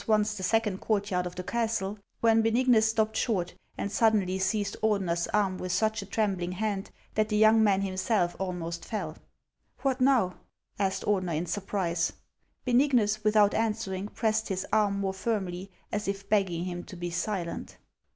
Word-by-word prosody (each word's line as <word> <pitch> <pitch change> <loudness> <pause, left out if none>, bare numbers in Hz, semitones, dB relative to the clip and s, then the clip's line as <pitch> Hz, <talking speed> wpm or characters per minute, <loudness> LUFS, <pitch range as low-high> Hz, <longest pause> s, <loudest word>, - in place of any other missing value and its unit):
241 215 0 +3
once 210 0 0
the 195 - -6
second 210 0 +1
courtyard 200 -4 0
of 175 - -8
the 180 - -5
castle, 220 -3 -1 0.3
when 225 -1 +5
Benignus 225 0 +4
stopped 220 -1 +1
short, 190 -7 0 0.2
and 200 - -3
suddenly 205 -5 +2
seized 200 +1 0
Ordener's 190 -6 +1
arm 195 -3 +1
with 185 - -3
such 220 +4 +1
a 195 - -9
trembling 195 -4 -1
hand 200 0 -2 0.2
that 215 0 +1
the 210 - +1
young 220 +1 +6
man 195 -2 +3
himself 185 -1 0
almost 170 -3 -4
fell 215 - -4 0.3
" - - -36
What 265 -1 +1
now? 250 -9 +3 0.2
" - - -34
asked 195 -1 0
Ordener 185 -5 0
in 170 - -1
surprise. 180 -2 -1 0.5
Benignus, 240 -5 +3
without 210 -1 +4
answering, 210 -3 -1
pressed 220 0 0
his 190 -2 -2
arm 205 -2 +3
more 195 -1 -1
firmly, 190 -3 -3 0.2
as 210 0 -2
if 195 0 -3
begging 185 -5 +1
him 175 -1 -4
to - - -10
be 175 0 -4
silent. 175 0 -3
205 Hz, 170 wpm, -28 LUFS, 185-220 Hz, 0.5 s, young